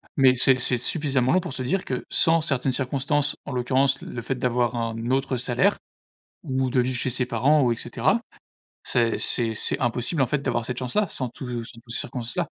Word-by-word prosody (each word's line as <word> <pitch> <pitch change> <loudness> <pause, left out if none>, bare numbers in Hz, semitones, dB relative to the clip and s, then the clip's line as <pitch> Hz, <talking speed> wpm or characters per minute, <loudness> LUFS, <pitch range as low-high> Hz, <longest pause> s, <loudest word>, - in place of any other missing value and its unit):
mais 130 -2 +6
c'est 130 +1 +4
c'est 125 - +4
suffisamment 135 0 +1
long, 185 - +4
pour 170 - -6
se 130 - -5
dire 185 +9 -1
que, 125 - -3
sans 165 0 +3
certaines 140 -4 0
circonstances, 140 +2 0
en - - -6
l'occurrence 130 +2 +1
le 120 - -6
fait 135 - -3
d'avoir 125 -1 0
un 115 +1 -3
autre 135 -1 0
salaire 120 0 +1 0.7
ou 130 -1 -1
de 130 - +2
vivre 125 0 0
chez 125 - -1
ses 125 0 -1
parents 135 +6 +3
ou 120 - +2
et - - +1
cetera. - - 0 0.7
C'est-c'est 115 -1 +1
c'est - - -1
impossible, 125 +5 0
en - - +3
fait, 140 +1 -1
d'avoir 120 -4 -1
cette 125 +1 -4
chance-là, 145 +10 0
sans 130 - -3
tout 120 -1 -6
sans 115 0 -12
tout 115 - -17
ces 115 - +1
circonstances-là. 120 -4 -3
125 Hz, 205 wpm, -24 LUFS, 120-135 Hz, 0.7 s, mais